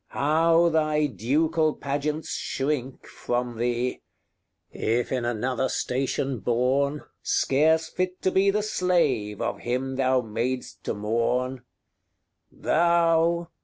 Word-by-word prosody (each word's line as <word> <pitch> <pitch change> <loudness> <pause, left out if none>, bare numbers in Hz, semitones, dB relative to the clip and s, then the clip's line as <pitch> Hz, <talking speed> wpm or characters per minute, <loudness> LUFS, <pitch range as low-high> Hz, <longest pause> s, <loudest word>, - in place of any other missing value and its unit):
how 165 +3 +3
thy 155 -1 +2
ducal 150 - +1
pageants 145 +3 -3
shrink 135 -2 -3
From 120 -1 -3
thee! 120 +1 -1 0.7
if 120 +2 -1
in 125 -2 -1
another 125 +2 -1
station 130 0 -1
born, 130 +6 0 0.2
Scarce 160 +4 +2
fit 185 +2 -3
to 185 - +2
be 195 +1 +3
the 210 +1 +1
slave 150 - 0
of - - -2
him 130 +2 -2
thou 130 -1 +2
mad'st 120 +3 -4
to - - -2
mourn: 115 +5 0 0.9
XXXVIII. - - -23
THOU! 170 0 +3
135 Hz, 115 wpm, -25 LUFS, 125-160 Hz, 0.9 s, how